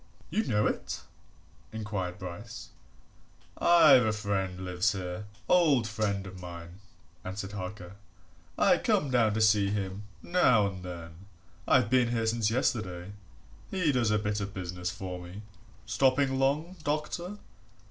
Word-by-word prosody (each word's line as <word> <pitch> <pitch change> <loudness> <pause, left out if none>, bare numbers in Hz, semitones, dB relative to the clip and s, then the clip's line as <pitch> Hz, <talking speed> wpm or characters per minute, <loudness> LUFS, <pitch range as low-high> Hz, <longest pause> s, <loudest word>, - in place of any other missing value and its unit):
"You 220 - +1
know 105 -1 +1
it?" - - -2 0.7
inquired 105 -5 -4
Bryce. 105 +6 -8 0.9
"I've 155 -7 +7
a 110 - +2
friend 95 -3 -2
lives 90 +3 +1
here 90 +1 -5 0.2
old 150 -10 +4
friend 105 -3 -1
of 95 -1 -9
mine," 85 +1 -9 0.4
answered 95 +1 -5
Harker. 95 -1 -7 0.6
"I - - +4
come 140 - +1
down 115 -4 +3
to 110 - 0
see 105 -2 +4
him 100 0 -3 0.2
now 125 - +4
and 95 -2 -4
then 85 +1 -9 0.4
I've 105 - +4
been 130 -2 +4
here 115 -1 0
since 110 -1 +1
yesterday. 100 -6 -1 0.6
He 180 -6 +1
does 125 -5 +1
a 105 - +3
bit 105 0 -1
of 100 0 -5
business 90 -1 -4
for 90 -1 -6
me. 90 +4 -9 0.4
Stopping 130 +4 +2
long, 150 +7 0
doctor?" 155 +6 -2
105 Hz, 135 wpm, -29 LUFS, 95-125 Hz, 0.9 s, I've